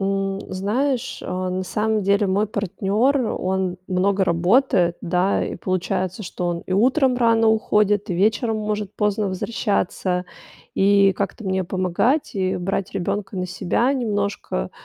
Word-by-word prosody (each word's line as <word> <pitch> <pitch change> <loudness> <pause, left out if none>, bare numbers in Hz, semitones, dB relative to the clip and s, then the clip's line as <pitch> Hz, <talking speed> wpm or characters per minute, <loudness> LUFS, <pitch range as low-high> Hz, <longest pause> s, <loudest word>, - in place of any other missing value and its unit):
М, 195 0 -1
знаешь, 245 +7 -1
а, 185 0 -3
на 185 +1 -2
самом 215 +3 0
деле 200 +1 +2
мой 200 +3 +1
партнёр, 205 +6 0 0.2
он 185 -1 -1
много 190 +1 +1
работает, 175 0 +2
да. 180 +3 +1
И - - -4
получается, 185 +2 -2
что 180 0 -4
он 170 -1 -2
и - - -3
утром 255 +6 +3
рано 230 -2 +3
уходит, 210 -2 +2
и - - 0
вечером 220 +4 +1
может 210 -1 -3
поздно 210 -1 0
возвращаться. 185 -2 -1 0.5
И 200 0 +4
как-то 200 +4 -4
мне 190 0 0
помогать 185 - 0
и 185 -1 0
брать 195 +2 -2
ребёнка 195 +2 -3
на 185 0 -2
себя 190 +8 0
немножко 205 - -2
195 Hz, 140 wpm, -22 LUFS, 185-215 Hz, 0.5 s, И